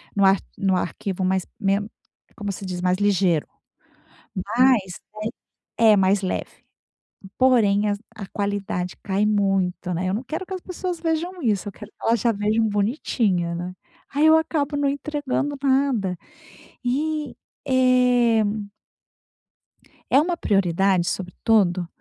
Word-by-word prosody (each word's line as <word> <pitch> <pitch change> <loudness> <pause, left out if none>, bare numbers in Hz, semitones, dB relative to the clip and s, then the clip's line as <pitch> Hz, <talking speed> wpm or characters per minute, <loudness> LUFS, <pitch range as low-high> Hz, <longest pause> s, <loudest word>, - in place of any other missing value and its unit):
no 200 -1 +4
ar 195 +1 +6 0.2
no 190 -1 +1
arquivo, 185 +1 -3
mais 185 0 +1
men 200 -1 +1 0.5
como 205 -2 -4
se 195 0 -7
diz, 180 -1 -4
mais 180 0 +2
ligeiro. 190 -5 +2 0.9
Mas 210 -1 +2 0.8
é 225 -1 +6
é - - +5
mais 195 +1 +3
leve. 185 - -4 0.7
Porém, 215 -6 +4
a - - +1 0.2
a 205 -3 -6
qualidade 200 -3 -3
cai 200 +1 0
muito, 195 -3 0
né? 185 +2 -1
Eu 185 - 0
não 220 - -2
quero 330 +6 -5
que 380 - -5
as 370 - -5
pessoas 360 -1 -5
vejam 335 +2 -2
isso. 210 -4 0
Eu - - -7
quero 210 +2 -12
que - - -58
elas 230 -1 +3
já 235 - +2
vejam 215 +2 +1
bonitinha, 205 - 0
né? 175 +2 -5 0.4
Aí 295 +2 +4
eu 315 0 +7
acabo 300 -3 0
não 285 -1 +1
entregando 285 0 -2
nada 260 -9 +1 0.7
e 300 +4 -1 0.3
eh 250 -3 +4 1.7
É 270 - +8
uma 345 +4 +1
prioridade, 190 - +2
sobretudo, 185 -1 +1
210 Hz, 140 wpm, -23 LUFS, 190-265 Hz, 1.7 s, É